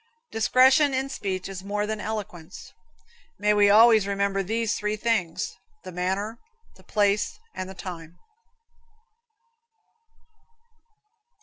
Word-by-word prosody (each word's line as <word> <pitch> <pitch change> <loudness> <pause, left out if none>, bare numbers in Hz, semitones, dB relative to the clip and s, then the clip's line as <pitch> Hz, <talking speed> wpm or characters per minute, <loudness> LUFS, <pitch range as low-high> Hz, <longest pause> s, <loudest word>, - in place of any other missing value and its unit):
Discretion 260 +5 +4
in 265 +1 -1
speech 190 -7 -4
is 190 -1 -7
more 205 +1 -2
than 215 0 -4
eloquence. 190 -6 -7 0.6
May 210 0 +2
we 205 -1 +5
always 220 -1 +6
remember 200 0 0
these 220 +3 -1
three 210 0 -2
things: 215 -7 -1 0.3
The 185 - -8
manner, 190 +5 -3 0.4
the - - -19
place 205 - 0 0.2
and 185 0 -6
the 190 - -9
time. 170 -3 -9
205 Hz, 110 wpm, -25 LUFS, 190-220 Hz, 0.6 s, always